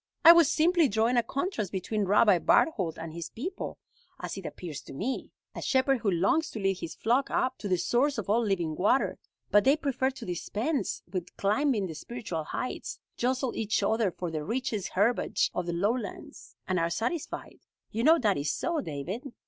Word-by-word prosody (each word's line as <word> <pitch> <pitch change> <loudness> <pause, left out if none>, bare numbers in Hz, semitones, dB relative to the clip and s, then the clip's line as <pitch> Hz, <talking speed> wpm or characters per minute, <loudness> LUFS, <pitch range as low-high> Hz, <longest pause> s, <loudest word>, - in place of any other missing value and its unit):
I 335 - +13
was 335 -3 +6
simply 335 0 +4
drawing 225 +2 +1
a 240 - +5
contrast 235 - -3
between 200 +2 -1
Rabbi 205 -1 +5
Barthold 185 - +2
and 165 -1 -7
his 170 0 -6
people, 360 - -5 0.4
as - - -5
it - - -6
appears 165 -6 -7
to - - -11
me 225 - -3 0.2
a - - -6
shepherd 265 0 +2
who 215 - 0
longs 195 - +2
to 220 - -6
lead 195 -2 0
his 165 - -6
flock 245 +5 +1
up 260 0 0
to 205 - -4
the 185 -2 +2
source 245 +11 +1
of 220 - -4
all 225 +4 +3
living 175 -7 0
water; 210 - +2 0.3
but 205 - +6
they 275 +3 +4
prefer 270 -3 0
to 265 - -9
dispense 210 - -2
with 180 -2 -5
climbing 215 +1 +1
the 170 - -5
spiritual 170 -2 -5
heights, 255 - -4 0.2
jostle 255 +1 -1
each 215 -2 0
other 220 0 +2
for 175 -1 -5
the 155 -2 -3
richest 220 0 -2
herbage 215 +6 +2
of 180 -1 -3
the - - 0
lowlands, 205 +4 -3
and 185 -1 +1
are 165 0 +1
satisfied. 235 - -3 0.3
You 225 +2 -2
know 320 +4 +7
that 210 - +2
is 145 +1 -1
so, 325 - -1
David." 185 - -5
220 Hz, 190 wpm, -29 LUFS, 185-260 Hz, 0.4 s, I